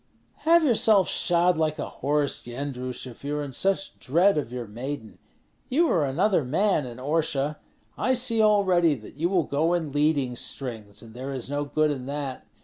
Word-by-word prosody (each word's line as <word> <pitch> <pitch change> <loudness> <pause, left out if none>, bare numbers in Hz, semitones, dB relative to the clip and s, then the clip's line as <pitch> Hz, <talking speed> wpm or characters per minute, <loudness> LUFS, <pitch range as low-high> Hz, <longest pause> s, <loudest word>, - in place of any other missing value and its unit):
"Have 335 0 +6
yourself 220 - +4
shod 175 -1 +2
like 155 -1 0
a - - -3
horse, 145 0 -1
Yendrus, 125 0 -5
if 125 0 -11
you 145 +1 -2
are 150 - -2
in 140 -2 -7
such 195 +6 -1
dread 175 +9 +3
of 145 -6 -2
your 125 -1 -4
maiden. 115 +2 -7 0.5
You 315 +7 +3
were 150 -4 +2
another 180 +5 +2
man 155 +2 +1
in 120 - -9
Orsha. 150 +1 -1 0.4
I 260 - +2
see 235 -2 +1
already 190 -7 +4
that 110 -4 -12
you 165 +5 -1
will 185 -3 +2
go 155 +5 0
in 160 -4 -2
leading 145 -3 +1
strings, 110 -5 -6
and 110 -1 -13
there 130 +3 -6
is 130 +1 -5
no 145 0 -1
good 155 +1 +1
in 130 -3 -5
that. 140 -2 -5
145 Hz, 185 wpm, -26 LUFS, 130-175 Hz, 0.5 s, Have